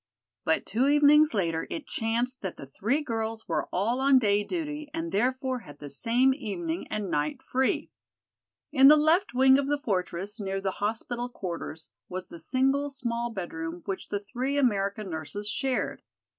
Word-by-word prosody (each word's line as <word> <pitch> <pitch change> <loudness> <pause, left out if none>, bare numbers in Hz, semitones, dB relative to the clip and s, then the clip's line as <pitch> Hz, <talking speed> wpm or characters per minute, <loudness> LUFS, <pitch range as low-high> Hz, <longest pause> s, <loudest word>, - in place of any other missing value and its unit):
But - - +2
two 250 +5 +1
evenings 295 +1 +6
later 165 -5 0
it 320 - -5
chanced 235 +3 -1
that 190 -3 -4
the - - -8
three 225 - -1
girls 225 -3 -3
were 165 - -1
all 225 +7 0
on 270 0 +5
day 205 -4 +3
duty 300 - -4
and 330 0 -3
therefore 255 +4 0
had 145 -10 -13
the 145 -1 -9
same 245 - +3
evening 185 - -4
and 205 -3 -3
night 150 +1 -1
free. 260 +1 0 0.8
In 270 -2 +7
the 300 +2 +9
left 310 -3 +3
wing 265 +1 +6
of 275 - -1
the 290 +1 +1
fortress, 195 -3 -3
near 195 -1 -2
the 195 0 -1
hospital 235 +3 -2
quarters, 170 - -5 0.2
was 185 0 -5
the 170 - -9
single, 270 +5 +1
small 240 -3 -2
bedroom 175 -4 -5
which 195 -2 -4
the 205 - -1
three 255 +7 -3
American 205 -5 +1
nurses 160 +7 -3
shared. 255 +4 -1
230 Hz, 170 wpm, -28 LUFS, 195-265 Hz, 0.8 s, the